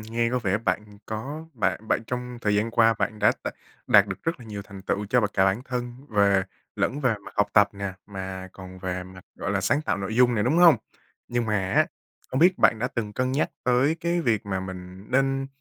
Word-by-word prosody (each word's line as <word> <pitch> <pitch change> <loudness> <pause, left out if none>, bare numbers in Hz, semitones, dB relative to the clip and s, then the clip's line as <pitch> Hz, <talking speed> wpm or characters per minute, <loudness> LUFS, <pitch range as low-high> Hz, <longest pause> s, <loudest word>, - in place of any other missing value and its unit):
nghe 115 +2 -1
có 125 - +1
vẻ 105 -4 0
bạn 105 -1 -3
có 135 +9 -5
bạn 110 -2 -1
bạn - - +1
trong 125 -1 -4
thời 105 -2 +1
gian 105 +3 +1
qua 115 -1 +4
bạn 110 - -1
đã 105 - +5
đ - - 0 0.4
đạt 100 -1 +6
được 95 - -6
rất 165 -4 -2
là - - -10
nhiều 105 -2 -6
thành 100 -1 -11
tựu 100 +1 -2
cho 125 +4 +3
bạn 105 - 0
cả 95 - +4
bản 95 +6 +1
thân 125 -1 -3 0.2
về 100 -2 +3 0.3
lẫn 145 - 0
về 125 -5 +2
mặt - - -10
học 105 - +3
tập 105 -1 +6
nè, 100 -1 -4
mà 95 -2 -6
còn 95 -1 -11
về 90 0 -3
mặt, 95 0 -13
gọi - - -4
là, 100 -1 +1
sáng 140 +10 +1
tạo - - 0
nội 100 +2 -4
dung 125 -1 +5
nè, 105 - +1
đúng 140 +7 +2
hông? 175 -3 +8 0.5
Nhưng 120 -1 -1
mà 100 -3 0
á, - - +4 0.4
không 130 - 0
biết 180 +2 +5
bạn 115 - +4
đã 125 +3 -1
từng 110 -4 -4
cân 130 +3 -1
nhắc 145 +3 +1
tới 125 +5 +3
cái 170 +1 0
việc 110 -8 0
mà 95 -2 -2
mình 95 +1 -8
nên 135 +1 +1
110 Hz, 240 wpm, -25 LUFS, 100-125 Hz, 0.5 s, hông